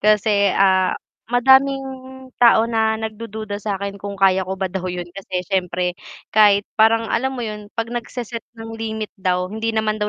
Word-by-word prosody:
Kasi, 210 -1 +3
ah, 190 -1 +3 0.3
madaming 265 +2 +4 0.6
tao 230 -2 +6
na 220 -1 +1
nagdududa 220 -1 -6
sa'kin 200 -1 -4
kung 200 0 -6
kaya 190 -1 +3
ko 190 - -3
ba 190 - -2
daw 185 -1 -3
'yun 180 -1 -5
kasi 185 -1 -4
siyempre 180 -2 -1 0.4
kahit 205 -2 +5
parang 225 0 +4
alam 265 +2 0
mo 240 - -3
yun 210 -1 -7
'pag 230 +1 -3
nagse-set 240 -1 -5
ng 225 0 -8
limit 220 -1 -4
daw, 185 -3 -1
hindi 220 +1 -2
naman 215 0 0
daw 210 - 0
215 Hz, 165 wpm, -20 LUFS, 195-225 Hz, 0.6 s, tao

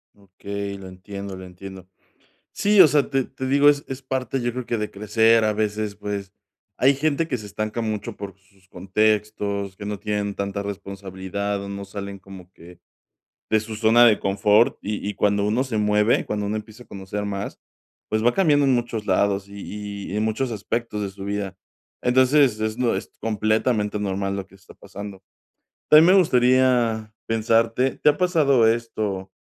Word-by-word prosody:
Okey, 100 0 -7
lo 95 -1 -10
entiendo, 100 +1 -8
lo 95 - -9
entiendo. 95 0 -11 0.6
Sí, 205 -1 +5
o 165 - +9
sea, 145 -1 +2
te 135 -1 +1
te 130 0 -7
digo, 140 +2 +5
es 145 0 +2
es 135 0 -6
parte, 130 0 -2
yo 120 - -1
creo 125 +1 -5
que 120 - -1
de 105 -1 -3
crecer, 110 +2 +3
a 105 -1 +2
veces, 105 -1 -2
pues, 100 -2 -5 0.4
hay 135 +2 +4
gente 155 +3 0
que 130 -6 -2
se 105 - -9
estanca 110 +3 -4
mucho 110 0 -4
por 100 -1 -8
sus 100 -1 -29
contextos, 100 0 -1
que 100 - -9
no 105 -1 -4
tienen 105 -1 -2
tanta 100 0 -3
responsabilidad, 100 0 -5
o 100 - -7
no 100 0 -6
salen 100 -1 -7
como 95 -2 -13
que 85 +1 -15 0.7
de 110 - +3
su 110 +1 -7
zona 115 +2 +5
de 110 -3 +5
confort, 105 +5 +3
y 105 -1 -4
y 105 - -2
cuando 100 0 +1
uno 110 +5 +1
se 125 -5 -3
mueve, 105 +1 +2
cuando 105 -1 -2
uno 105 +2 -2
empieza 110 +3 -8
a - - -27
conocer 100 +1 -5
más, 100 0 -5 0.5
pues 110 +1 0
va 120 - +4
cambiando 150 -7 +3
en 135 - +3
muchos 120 -3 -2
lados 100 +1 +1
y 100 0 -7
y - - -3
en 105 - 0
muchos 115 +4 -1
aspectos 110 0 -3
de 100 - -2
su 95 0 -9
vida. 100 -1 -4 0.4
Entonces, 130 -1 +4
es 110 0 -2
lo 120 -2 +2
es - - -6
completamente 110 0 0
normal 100 0 -2
lo 100 - -4
que 95 - -20
está 95 -1 -17
pasando. 100 -1 -10 0.7
También 155 +2 +8
me - - +7
gustaría 125 -6 +2
pensarte, 115 +3 +1
¿te - - +4
ha 145 - +1
pasado 145 -10 +3
esto 110 -5 -2
105 Hz, 185 wpm, -23 LUFS, 100-120 Hz, 0.7 s, o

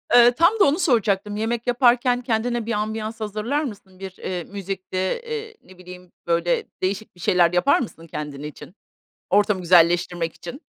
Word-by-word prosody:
Eee, 240 0 +8
tam 340 - +3
da 390 - +7
onu 295 +5 +2
soracaktım, 210 - +1
yemek 225 +2 -2
yaparken 245 0 +3
kendine 235 -1 -1
bir 230 - -3
ambiyans 220 +1 -3
hazırlar 215 +8 -2
mısın? 200 -6 -9
Bir, 190 -1 -7
eee, 180 -2 -4
müzikti, 195 -1 -6
eee, 450 - -3
ne 185 - -17
bileyim, 180 0 -13 0.2
böyle, 170 0 +1 0.2
değişik 195 +3 -3
bir 175 - -20
şeyler 175 0 +3
yapar 180 +10 +3
mısın 165 -9 -7
kendin 150 -2 -6
için, 150 +4 -10 0.5
ortamı 205 -1 +2
güzelleştirmek 175 -1 +3
için? 275 +6 -9
210 Hz, 160 wpm, -22 LUFS, 180-240 Hz, 0.5 s, Eee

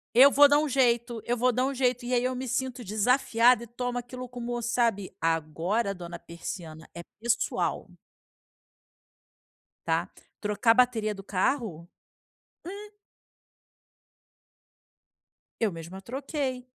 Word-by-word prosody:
Eu 270 +4 +9
vou 290 +1 +8
dar 290 - +5
um 305 - +1
jeito 240 -3 +1
eu 240 +1 -1
vou 250 +2 +3
dar 250 +2 +1
um 275 - -2
jeito 250 -1 0
e 245 +1 -3
aí 240 - +2
eu 255 0 -1
me 260 +1 -4
sinto 255 0 -2
desafiada 235 +2 +3
e - - -10
tomo 245 +1 -3
aquilo 250 +1 -8
como 240 -1 -4
sabe, 230 -5 0
agora 165 +7 0
dona 175 -2 -8
persiana, 165 -2 -8
é 170 - -6 0.2
pessoal. 235 0 0 2.0
Tá? - - 0 0.3
Trocar 210 +2 +2
a - - +4
bateria 230 -4 +2
do 195 - -10
carro? 190 - -1 0.9
Hum. 415 +1 -9 2.7
Eu 225 -3 +1
mesma 170 +3 -9
troquei. 265 - -4
240 Hz, 130 wpm, -28 LUFS, 200-255 Hz, 2.7 s, Eu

